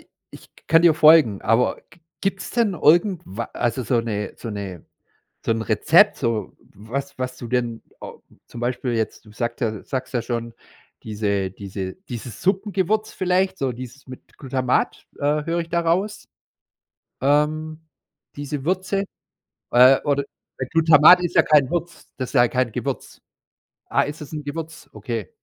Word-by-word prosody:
i - - -30 0.2
Ich - - -14 0.2
kann 165 +1 +5
dir 170 -2 +6
folgen, 150 -10 +6
aber 115 +3 +2
g 170 - -21 0.2
gibt´s 195 -1 -2
denn 230 -6 +2
irgendwa 160 - +2
also 120 +2 -1
so 120 0 +1
'ne 105 -3 -4
so 115 - -7
'ne 100 -5 -6 0.6
so - - -1
'n 115 0 -2
Rezept, 160 - +4
so 115 -4 -2 0.2
was 135 +8 -6
was 130 0 -4
du 120 - -8
denn 120 -2 -1 0.2
äh, - - -7 0.4
zum 120 - -10
Beispiel 125 0 -2
jetzt, 110 0 -3
du 105 - -16
sagt 120 +2 -4
ja 115 - +1
du 105 - -9
sagst 130 0 -5
ja 120 - +1
schon, 115 -1 -4 0.5
diese 100 -3 -2
diese 95 -1 -6
dieses 120 -2 -7
Suppengewürz 200 +2 0
vielleicht, 185 +1 0
so 135 -2 -1
dieses 130 +3 -10
mit 130 0 -13
Glutamat, 130 -2 -1
äh, 145 +1 0
höre 170 +2 -1
ich 165 - -6
da 170 +1 0
raus? 180 +5 -1 0.9
Ähm, 155 +3 +1 0.6
diese 145 -1 -5
Würze, 190 +3 0 0.7
äh, 130 +2 +7
oder 140 -1 +1 0.4
d 130 - -1
Glutamat 165 +2 +7
ist 175 0 -2
ja - - +7
kein 145 -4 +4
Würz 175 0 -4
das 130 -2 -4
ist - - -15
ja 120 -2 +5
kein 125 -3 -1
Gewürz. - - -5 0.7
Ah, - - +3
ist 145 +2 -5
es 150 - -9
´n 150 -1 -4
Gewürz? 160 +2 -7
Okay. 115 -6 -5
135 Hz, 165 wpm, -22 LUFS, 115-165 Hz, 0.9 s, äh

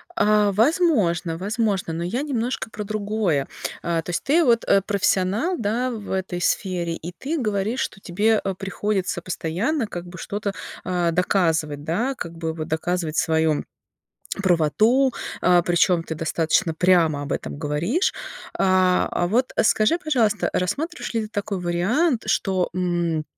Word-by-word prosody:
А 210 -7 +3
возможно, 210 - +2
возможно, 200 -2 -1
но 165 +1 -3
я 225 +10 -2
немножко 250 -5 -2
про 210 -1 -6
другое. 205 -8 -1 0.4
А 170 -1 0
то 160 - -10
есть 175 - -2
ты 325 +5 +3
вот, 235 -5 +3
э, 195 - +5
профессионал, 200 - +1
да, 235 +3 -1
в 215 -4 -7
этой 190 -2 -2
сфере, 175 -5 0
и 170 +2 -7
ты 285 - -4
говоришь, 215 +1 -1
что 195 - -3
тебе, 210 +4 +1
э, 195 - -1
приходится 195 -1 -2
постоянно, 195 - -2
как 175 -3 -6
бы, 175 +1 -10
что-то, 200 +3 -3 0.3
а, 175 -2 0
доказывать, 165 -5 +1
да, 225 - -1
как 170 -8 -6
бы 160 -1 -3
доказывать 160 0 -2
вот - - +3
свою 160 -1 +1 0.8
правоту, 215 - +3 0.3
а, 180 -1 +4
причём 175 0 +2
ты 165 - -5
достаточно 165 +1 +1
прямо 165 -4 +3
об 145 - -4
этом - - -4
говоришь. 165 - 0 0.5
А, 185 -1 +3
а 175 - 0
вот 245 +6 +1
скажи, 215 +9 +3
пожалуйста, 245 - +1
рассматриваешь 300 - -2
ли 225 - +1
ты 215 - -6
такой 205 -2 -3
вариант, 220 - +1
что, 190 -2 +1
м, 175 -3 0
190 Hz, 150 wpm, -23 LUFS, 170-220 Hz, 0.8 s, э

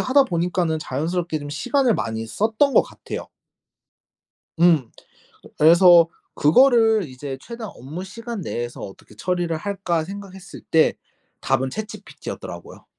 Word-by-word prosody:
하다 275 +2 +4
보니까는 175 -4 -1
자연스럽게 160 +4 -2
좀 145 -1 -8
시간을 245 - +1
많이 110 -5 -3
썼던 220 - +1
것 - - +7
같아요. - - -8 1.3
음. 160 -9 +4 0.7
그래서 170 +1 +7 0.3
그거를 225 - +4
이제 135 +1 -7
'최대한 230 - -8
업무시간 195 - -7
내에서 120 -5 -5
어떻게 100 +2 -11
처리를 175 - -1
할까?' 180 -3 -2
생각했을 190 0 -10
때 160 -1 +4 0.5
답은 130 +1 0
ChatGPT였더라고요. 215 +5 -8
175 Hz, 320 characters per minute, -22 LUFS, 150-210 Hz, 1.3 s, 것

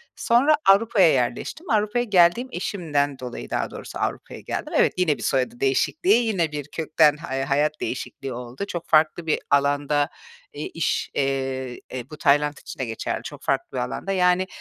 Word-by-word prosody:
Sonra 260 +6 +4
Avrupa’ya 195 -3 +5
yerleştim. 125 - -2
Avrupa’ya 215 +2 +1
geldim, 190 +4 +4
eşimden 145 -7 -1
dolayı 125 -1 -7
daha - - -2
doğrusu - - -8
Avrupa’ya - - -4
geldim. - - -5
Evet, - - +4
yine 160 -7 +2
bir 115 - -8
soyadı 125 -2 0
değişikliği, 240 - +2
yine 175 -8 0
bir 145 -1 -5
kökten 155 -1 +2
ha 150 -4 -5
eee, 135 - -1
hayat 150 +3 0
değişikliği 130 +1 -5
oldu. 125 +9 -6
Çok 175 -3 -5
farklı 160 +2 +3
bir 155 - +1
alanda, 145 +1 +2 0.4
eee, 150 - -5
iş, 165 - -1
eee, 135 -2 -2
e, 130 0 -6
bu 155 - -9
Tayland 145 +1 +2
için - - -10
de 130 - -1
geçerli, 115 -1 -4
çok - - -9
farklı - - -1
bir 125 - 0
alanda. 135 +10 -4
Yani, 180 0 +2
150 Hz, 175 wpm, -24 LUFS, 135-180 Hz, 0.4 s, Avrupa’ya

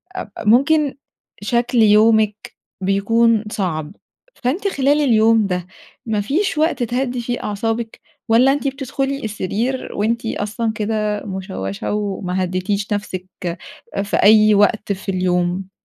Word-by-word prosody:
أب 365 - -5 0.2
ممكن 280 +6 +3 0.5
شكل 240 +4 0
يومِك 215 0 +3 0.3
بيكون 220 +4 +2
صعب، 170 -6 -3 0.4
فأنتِ 305 +12 -1
خلال 290 -4 +2
اليوم 225 -4 +4
ده 180 -2 -3 0.4
ما 215 -3 0
فيش 310 - -1
وقت 310 -4 +1
تهدي 245 +1 -2
فيه 240 +1 -4
أعصابِك، 225 +2 -3 0.3
والّا 250 +4 +5
أنتِ 285 0 -2
بتدخُلي 270 +1 -3
السرير 220 +5 -3
وأنتِ 230 +3 -1
أصلًا 220 +2 -2
كده 210 -1 -1
مُشوَّشة 190 - -4
وما 190 -3 -2
هدِّيتيش 195 +3 -2
نفسِك 190 -3 -4 0.8
في 200 - -1
أي 215 +1 +6
وقت 205 +1 +2
في 195 +1 -8
اليوم؟ 180 0 -1
215 Hz, 120 wpm, -19 LUFS, 200-245 Hz, 0.8 s, أي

